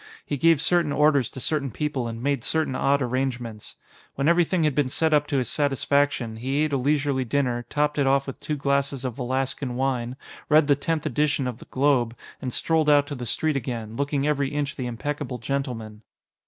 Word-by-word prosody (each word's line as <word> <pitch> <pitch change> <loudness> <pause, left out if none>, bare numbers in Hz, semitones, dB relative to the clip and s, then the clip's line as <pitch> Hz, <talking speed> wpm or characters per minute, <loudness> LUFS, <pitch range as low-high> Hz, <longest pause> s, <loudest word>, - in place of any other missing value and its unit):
He - - -2
gave 165 +2 +4
certain 165 -1 +2
orders 140 -2 +3
to - - -9
certain 140 +1 -1
people 135 0 -2
and 115 +1 -6
made 140 -3 0
certain 160 -5 0
odd 140 +1 +2
arrangements. 125 -3 -3 0.4
When 140 +1 0
everything 170 0 +3
had 150 -2 +2
been 140 -1 +1
set 160 +3 +1
up 150 0 +3
to 140 - 0
his 125 -3 0
satisfaction, 140 -4 +1
he 135 +6 0
ate 155 -2 -1
a - - +3
leisurely 140 0 +1
dinner, 125 -1 -1
topped 150 0 0
it 140 - +2
off 135 0 +3
with 135 - -7
two 150 - -3
glasses 140 -1 0
of 125 - -2
Velaskan 130 0 -2
wine, 125 -2 -1 0.3
read 155 0 +6
the 145 0 +4
tenth 155 +2 -2
edition 145 +1 +1
of 125 -2 -4
the - - -12
Globe, 130 -4 +1 0.2
and 130 - -3
strolled 160 +3 +1
out 145 -1 +5
to 145 - -6
the 125 -2 -6
street 155 +4 0
again, 115 -4 -4
looking 140 +1 -1
every 140 -2 +1
inch 145 -1 -2
the 125 - -4
impeccable 130 +2 -4
gentleman. 115 -4 -4
140 Hz, 200 wpm, -25 LUFS, 125-150 Hz, 0.4 s, read